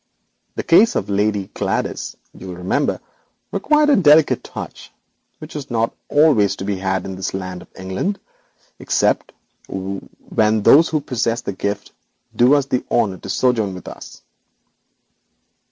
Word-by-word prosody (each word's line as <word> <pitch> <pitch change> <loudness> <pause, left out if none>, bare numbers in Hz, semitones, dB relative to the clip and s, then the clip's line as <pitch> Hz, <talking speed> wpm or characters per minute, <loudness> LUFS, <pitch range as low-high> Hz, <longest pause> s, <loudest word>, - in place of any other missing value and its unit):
The - - -3
case 215 +8 +5
of - - -2
Lady 100 -1 0
Gladys, - - -2 0.2
you 95 - -11
will 90 - -6
remember, 90 +1 -1 0.5
required 300 +9 +3
a - - +6
delicate 155 -4 +5
touch - - -9 0.5
which 155 0 -11
is 145 -2 -6
not 115 -1 0 0.2
always 145 -10 +4
to 95 - -6
be 100 -1 -1
had 95 -1 -1
in 95 - -5
this 95 0 -4
land 90 -2 -5
of - - -14
England, 95 - -3 0.6
except - - +1 0.4
when 100 +3 -2
those 155 +9 +6
who 155 -2 0
possess 115 -3 -1
the 100 - -4
gift 100 +2 -4 0.4
do 125 +4 +5
us 140 -2 +2
the 130 -2 -1
honour 100 -6 +1
to - - -9
sojourn 110 -7 +1
with 90 - -11
us.' - - -11
110 Hz, 150 wpm, -20 LUFS, 95-145 Hz, 0.6 s, a